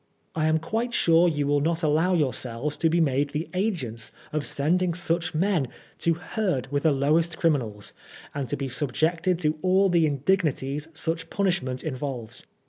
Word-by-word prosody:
I 155 -1 +1
am 155 0 +3
quite 225 +9 -2
sure 170 +1 +5
you 145 -3 -1
will 145 0 +2
not 165 +2 0
allow 160 +4 +3
yourselves 135 -2 -1
to 165 - +2
be 170 +2 +2
made 145 -2 +1
the 155 +3 -2
agents 170 - -1 0.2
of 150 -1 -1
sending 170 +4 +1
such 170 -1 0
men 175 -4 +1 0.3
to 165 -1 +2
herd 175 - -2
with 145 0 0
the 160 - +3
lowest 155 +5 +1
criminals, 120 - -1 0.4
and 140 -4 -3
to - - -1
be 135 - -3
subjected 160 +7 0
to 155 -1 0
all 190 +1 +3
the 170 -3 +3
indignities 145 -1 0
such 165 +1 -3
punishment 175 -10 -1
involves. 130 -6 -5
155 Hz, 165 wpm, -26 LUFS, 140-175 Hz, 0.4 s, sure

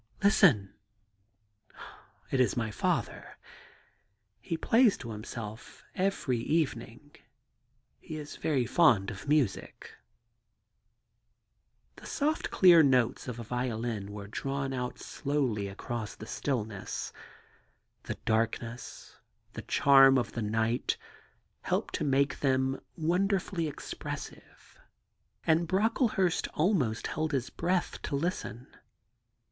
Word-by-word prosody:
' - - -19
Listen! 150 - +4 0.7
' 105 0 -18
*It 135 - +1
is 125 - +2
my 110 -2 -1
father. - - -2 1.0
He 165 - -3
plays 230 +4 +4
to 115 - -7
himself 110 +1 -8
every 185 -10 0
evening; 145 -1 -2 0.8
he 155 - -8
is 150 -1 -8
very 135 -6 0
fond 115 - +4
of 100 0 -9
music. 140 -10 0 1.0
' - - -47
The - - -11
soft, 305 +2 -1
clear 175 -3 +7
notes 130 -2 +2
of 125 -2 -5
a - - -5
violin 115 -3 -3
were 100 -1 -7
drawn 135 +5 -3
out 125 -1 -3
slowly 130 -8 -2
across 110 +3 -5
the 110 - -9
stillness. 110 -7 -3 0.9
The - - -5
darkness, 115 +1 -2 0.4
the - - -6
charm 135 -1 +6
of 120 -3 -1
the 115 - -4
night, 110 +3 0 0.6
helped - - -1
to - - -1
make 140 0 +1
them 130 -1 +1 0.2
wonderfully 180 +1 0
ex 150 - -7
pressive, - - -9 0.7
and 165 +1 +3
Brocklehurst 200 - +1
almost 150 - +1
held 155 0 -2
his 130 -2 -1
breath 180 +1 -1
to 140 - -3
listen. 140 -6 -3
135 Hz, 115 wpm, -30 LUFS, 115-160 Hz, 1.0 s, clear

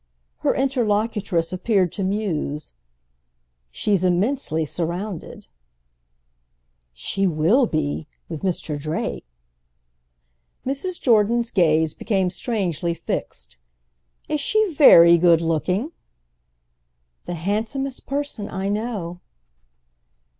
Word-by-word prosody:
Her - - +1
interlocutress 215 -9 0
appeared 185 -2 +1
to 195 - -4
muse. 175 - -2 1.0
"She's 195 - 0
immensely 180 - +1
surrounded." 175 +4 -5 1.5
"She 190 - -1
will 180 - +3
be—with 155 0 -4
Mr. 165 -5 -2
Drake!" 155 - -4 1.4
Mrs. 280 +8 -3
Jordan's 235 0 +2
gaze 160 -3 +3
became 190 -5 0
strangely 175 -5 -2
fixed. - - -5 0.7
"Is 300 -1 -1
she 430 +3 +1
very 170 - +8
good 170 -1 +5
looking?" 180 - -1 1.4
"The 175 - -3
handsomest 220 - -3
person 280 -7 -3
I 190 +1 -3
know." 205 -5 -3
190 Hz, 85 wpm, -22 LUFS, 165-230 Hz, 1.5 s, very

